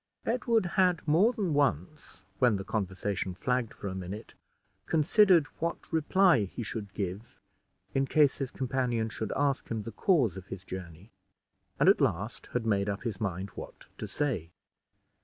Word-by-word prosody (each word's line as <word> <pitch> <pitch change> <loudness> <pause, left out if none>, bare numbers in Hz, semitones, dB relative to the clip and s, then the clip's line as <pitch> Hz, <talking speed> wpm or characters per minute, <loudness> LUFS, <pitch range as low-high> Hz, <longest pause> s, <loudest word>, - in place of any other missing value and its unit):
Edward 230 -3 +1 0.2
had 180 -4 +2
more 175 +10 +5
than 200 -9 -1
once, 140 - -1 0.2
when 125 -4 +4
the 95 - -3
conversation 95 -2 -2
flagged 125 +4 -1
for 100 - -7
a 95 - -3
minute, 95 +4 -7 0.5
considered 175 +1 +5
what 170 0 -4
reply 160 - +4
he 120 +5 -6
should 105 -2 -5
give 100 +3 -5 0.5
in 135 0 +1
case 150 -3 +4
his 135 -2 -2
companion 120 -4 -1
should 110 -1 -4
ask 140 -1 0
him 110 -2 -2
the 115 - -6
cause 130 - +2
of 95 -1 -9
his 95 -1 -8
journey, 90 +2 -8 0.7
and - - +4
at - - +6
last 100 +7 -1
had 125 -2 -1
made 100 -2 +1
up 100 0 -3
his 115 -5 -4
mind 95 -1 -2
what - - -10
to - - -4
say. 120 - -2
115 Hz, 160 wpm, -30 LUFS, 100-150 Hz, 0.7 s, at